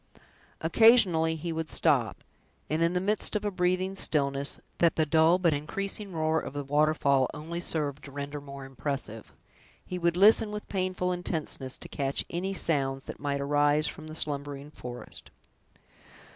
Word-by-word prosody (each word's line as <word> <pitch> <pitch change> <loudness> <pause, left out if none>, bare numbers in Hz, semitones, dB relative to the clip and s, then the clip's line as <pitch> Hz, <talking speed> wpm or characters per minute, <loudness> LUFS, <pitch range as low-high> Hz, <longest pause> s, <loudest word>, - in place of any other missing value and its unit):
Occasionally 170 -4 +5
he 165 +1 -4
would 160 -1 -3
stop; - - +1 0.5
and 155 +2 +1
in 170 +1 +3
the 180 - +1
midst 210 +3 0
of 210 0 -1
a 205 - 0
breathing 185 +1 0
stillness, 140 -6 -1 0.2
that 170 -2 +4
the 160 - +2
dull 160 +3 +4
but 175 -4 +2
increasing 195 +7 -4
roar 160 -1 +1
of - - -7
the 145 0 -3
waterfall 140 -2 +2
only 165 +3 -5
served 150 -4 -3
to 140 - -10
render 145 +1 -5
more 140 -1 -9
impressive, 135 -5 -5 0.5
he 180 - -4
would 170 0 +1
listen 215 +3 +6
with 210 0 -6
painful 185 -1 -1
intenseness, 160 -7 -3
to - - -10
catch 140 -1 -2
any 180 +3 -2
sounds 135 -6 0
that - - -8
might 140 -1 -2
arise 145 +1 +3
from 155 +1 -5
the 155 - -8
slumbering 145 -1 -2
forest. 125 -4 -8
155 Hz, 160 wpm, -28 LUFS, 140-180 Hz, 0.5 s, listen